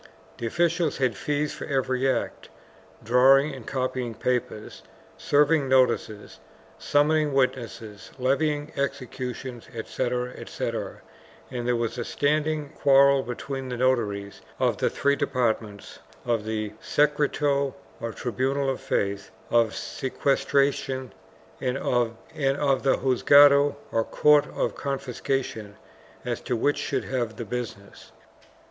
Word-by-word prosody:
The 115 Hz, -, -2 dB
officials 170 Hz, +3 st, +1 dB
had 130 Hz, -5 st, +1 dB
fees 150 Hz, +6 st, -1 dB
for -, -, -7 dB
every 130 Hz, -1 st, 0 dB
act, -, -, -3 dB, 0.5 s
drawing 135 Hz, +5 st, +5 dB
and 130 Hz, -4 st, -10 dB
copying 130 Hz, -3 st, -2 dB
papers, 120 Hz, -3 st, -3 dB, 0.3 s
serving 145 Hz, -1 st, +2 dB
notices, 125 Hz, -5 st, +1 dB, 0.4 s
summoning 150 Hz, 0 st, +2 dB
witnesses, 115 Hz, -5 st, -2 dB
levying 145 Hz, +3 st, 0 dB
executions, 130 Hz, -2 st, -4 dB
etc., 125 Hz, +2 st, -2 dB
etc., -, -, -5 dB, 0.5 s
and 120 Hz, -2 st, -4 dB
there 125 Hz, -, +2 dB
was 115 Hz, +1 st, -2 dB
a -, -, -1 dB
standing 150 Hz, +2 st, 0 dB
quarrel 140 Hz, -2 st, +4 dB
between 130 Hz, +2 st, -5 dB
the 125 Hz, -, -4 dB
notaries 105 Hz, -6 st, 0 dB, 0.2 s
of -, -, +1 dB
the -, -, +1 dB
three 140 Hz, 0 st, +1 dB
departments 115 Hz, -7 st, -2 dB
— -, -, -27 dB
of 110 Hz, -2 st, -2 dB
the 110 Hz, -1 st, -3 dB
secreto, 145 Hz, -1 st, +1 dB, 0.2 s
or 115 Hz, -, -4 dB
tribunal 135 Hz, +4 st, -1 dB
of 130 Hz, -, -5 dB
faith, 100 Hz, 0 st, -2 dB, 0.2 s
of 115 Hz, -2 st, +3 dB
sequestra 140 Hz, +1 st, +1 dB
tions 130 Hz, -3 st, -5 dB, 0.5 s
and 125 Hz, +1 st, -1 dB
of 120 Hz, -4 st, 0 dB, 0.2 s
the 135 Hz, -1 st, +1 dB
juzgado, 140 Hz, +2 st, +6 dB, 0.2 s
or 115 Hz, -, +1 dB
court 150 Hz, +5 st, +4 dB
of -, -, -2 dB
confiscations 135 Hz, -5 st, -3 dB, 0.3 s
— -, -, -26 dB
as 120 Hz, -1 st, -3 dB
to 125 Hz, -, -2 dB
which 145 Hz, +6 st, +1 dB
should -, -, -2 dB
have 120 Hz, -4 st, -2 dB
the 115 Hz, -, -6 dB
business. 110 Hz, -3 st, -7 dB
130 Hz, 125 wpm, -25 LUFS, 120-140 Hz, 0.5 s, juzgado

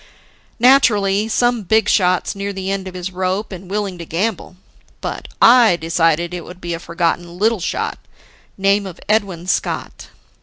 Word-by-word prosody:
"Naturally, 215 Hz, -5 st, +4 dB
some 240 Hz, +1 st, +1 dB
big 220 Hz, +3 st, +2 dB
shot's 185 Hz, -2 st, +2 dB
near 200 Hz, 0 st, -3 dB
the 190 Hz, 0 st, -4 dB
end 195 Hz, -1 st, -3 dB
of 185 Hz, -, -8 dB
his 180 Hz, +1 st, -5 dB
rope 185 Hz, +3 st, -2 dB
and 185 Hz, -1 st, -9 dB
willing 200 Hz, -3 st, -3 dB
to 170 Hz, -, -6 dB
gamble. 190 Hz, +2 st, -2 dB, 0.4 s
But -, -, -5 dB
I 235 Hz, -5 st, +6 dB
decided 165 Hz, 0 st, 0 dB
it 175 Hz, -2 st, -5 dB
would 180 Hz, 0 st, -11 dB
be 175 Hz, -1 st, -4 dB
a 165 Hz, -, -4 dB
forgotten 170 Hz, 0 st, -2 dB
little 220 Hz, +2 st, +2 dB
shot, 175 Hz, -, -3 dB, 0.6 s
name 200 Hz, +1 st, +2 dB
of 180 Hz, -2 st, -10 dB
Edwin 200 Hz, -5 st, 0 dB
Scott. 185 Hz, -, -3 dB
190 Hz, 160 wpm, -18 LUFS, 175-210 Hz, 0.6 s, I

